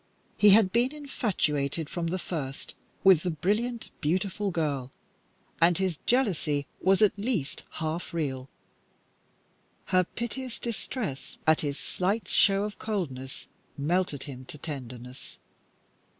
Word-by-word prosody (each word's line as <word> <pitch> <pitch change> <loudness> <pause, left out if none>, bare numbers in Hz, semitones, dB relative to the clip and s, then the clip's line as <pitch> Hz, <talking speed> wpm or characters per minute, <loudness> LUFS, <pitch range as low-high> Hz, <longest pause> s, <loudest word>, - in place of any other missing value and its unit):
He 210 - +6
had 200 -1 +7
been 245 +6 +2
infatuated 165 - -1
from 170 +1 -3
the 180 +3 -1
first 145 -7 -5 0.3
with 190 -4 +7
the 180 - -1
brilliant, 210 +9 -1
beautiful 185 +5 0
girl, 145 -7 -1 0.7
and 170 +1 +5
his 185 -5 -1
jealousy 170 - +2 0.2
was 195 +3 +4
at 210 - +6
least 200 - -1
half 160 +2 -3
real, 135 -5 -2 1.4
Her 185 0 +6
piteous 240 +5 -4
distress 210 - -4
at 160 0 +5
his 145 -2 -2
slight 200 +5 -1
show 195 0 +5
of 210 0 -5
coldness 135 -12 -4 0.3
melted 155 -1 0
him 130 -3 -8
to 150 - -6
tenderness. 130 -3 -7
175 Hz, 120 wpm, -28 LUFS, 145-205 Hz, 1.4 s, had